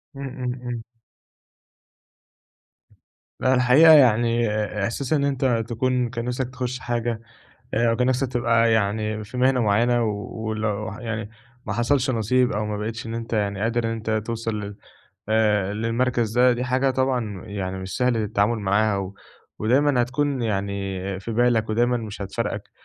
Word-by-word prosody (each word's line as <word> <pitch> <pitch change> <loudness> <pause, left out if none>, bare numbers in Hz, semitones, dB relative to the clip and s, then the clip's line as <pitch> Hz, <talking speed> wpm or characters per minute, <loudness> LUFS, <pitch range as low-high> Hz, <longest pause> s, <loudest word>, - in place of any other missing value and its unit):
إمم، 140 0 -5
إمم، 125 -1 -4
إمم. 120 -2 -4 2.6
لأ، 130 0 +3
الحقيقة 130 +6 +7
يعني 120 -4 +4 0.3
إحساس 125 +7 -2
إن 140 -2 +2
أنت 130 -4 +1
تكون 125 +1 0
كان 115 +1 -4
نفسك 125 +1 -2
تخش 130 0 -4
حاجة 120 -2 -2 0.5
أو 115 +1 +2
كان 125 +1 +1
نفسك 130 +1 +1
تبقى 115 -1 +2
يعني 110 0 0
في 125 +4 -9
مهنة 130 0 +3
معيّنة، 115 +3 +2
ولو 110 0 -3
يعني 115 -3 -4 0.4
ما - - -3
حصلش 130 +2 +1
نصيب 125 +2 +2
أو 105 +1 -1
ما 105 -1 -3
بقيتش 115 +2 -4
إن 115 - -5
أنت 115 0 -5
يعني 100 -2 0
قادر 115 +2 0
إن - - 0
أنت 110 -1 -5 0.2
توصل 115 -1 -3
لل 100 0 -7 0.5
آآ، 105 -3 +2
للمركز 115 +1 0
ده 125 0 +6
دي 120 +1 -2
حاجة 130 +1 +1
طبعًا 125 -7 -1
يعني 95 -2 -4
مش 95 0 -6
سهل 125 -2 +2
التعامل 110 +1 +1
معاها، 100 +1 +1
و 95 0 -5 0.4
ودايمًا 130 +3 +3
هتكون 135 +1 -1
يعني 100 -3 -2 0.2
في 115 +3 -5
بالك 115 -2 +2
ودايمًا 120 +2 +2
مش 105 -3 -6
هتفارقك. 100 - -4
115 Hz, 150 wpm, -23 LUFS, 105-125 Hz, 2.6 s, الحقيقة